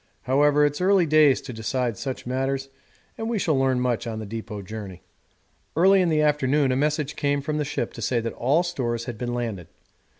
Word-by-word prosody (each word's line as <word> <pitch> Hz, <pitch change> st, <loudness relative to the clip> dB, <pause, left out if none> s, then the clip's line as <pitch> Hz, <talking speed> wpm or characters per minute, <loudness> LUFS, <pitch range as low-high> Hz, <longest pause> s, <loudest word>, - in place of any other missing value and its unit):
However, 145 Hz, +3 st, +3 dB
it's 145 Hz, +3 st, -1 dB
early 190 Hz, -1 st, +4 dB
days 155 Hz, -3 st, +4 dB
to 130 Hz, -, -8 dB
decide 115 Hz, +1 st, -2 dB
such 130 Hz, +5 st, -5 dB
matters, 135 Hz, +2 st, -2 dB, 0.5 s
and 225 Hz, 0 st, -3 dB
we 235 Hz, -, 0 dB
shall 160 Hz, -6 st, +1 dB
learn 135 Hz, -1 st, +2 dB
much 125 Hz, -2 st, -1 dB
on 110 Hz, -1 st, -4 dB
the 110 Hz, -, -5 dB
depot 105 Hz, -1 st, -6 dB
journey. 95 Hz, -3 st, -8 dB, 0.7 s
Early 190 Hz, +4 st, +5 dB
in 180 Hz, -, +2 dB
the 155 Hz, -1 st, +2 dB
afternoon 145 Hz, -2 st, +2 dB
a -, -, +1 dB
message 150 Hz, +1 st, 0 dB
came 145 Hz, 0 st, 0 dB
from 150 Hz, +2 st, -3 dB
the -, -, +1 dB
ship 145 Hz, +1 st, -3 dB
to -, -, -9 dB
say 120 Hz, -, +1 dB
that 115 Hz, 0 st, -4 dB
all 145 Hz, +8 st, +2 dB
stores 120 Hz, -9 st, -2 dB
had 120 Hz, -3 st, -6 dB
been 120 Hz, -1 st, -3 dB
landed. 110 Hz, -8 st, -4 dB
135 Hz, 205 wpm, -24 LUFS, 120-150 Hz, 0.7 s, Early